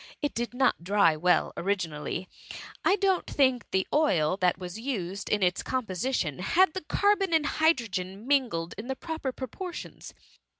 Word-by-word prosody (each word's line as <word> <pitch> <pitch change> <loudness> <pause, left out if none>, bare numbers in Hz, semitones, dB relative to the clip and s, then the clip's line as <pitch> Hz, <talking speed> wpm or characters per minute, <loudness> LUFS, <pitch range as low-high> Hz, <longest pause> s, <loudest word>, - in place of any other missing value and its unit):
It 290 - -2
did 240 +1 -3
not 255 -8 +2
dry 195 -3 +4
well 180 +3 +2
originally; 175 -2 -2 0.6
I 390 - +4
don't 385 -2 +1
think 260 -3 +1
the 190 0 +1
oil 185 - +3
that 180 -2 +2
was 180 +2 -7
used 200 -7 -4
in 210 -2 +1
its 180 0 +2
compo»tion 215 - -2
had 345 - +3
the 375 - -4
car* 405 +6 +2
bon 390 -4 -2
and 310 -2 +2
hydrogen 225 - 0
mingled 245 -12 +1
in 225 - -6
proper 320 -2 -4
propor 265 - -6
tions. - - -9
230 Hz, 160 wpm, -28 LUFS, 180-295 Hz, 0.6 s, dry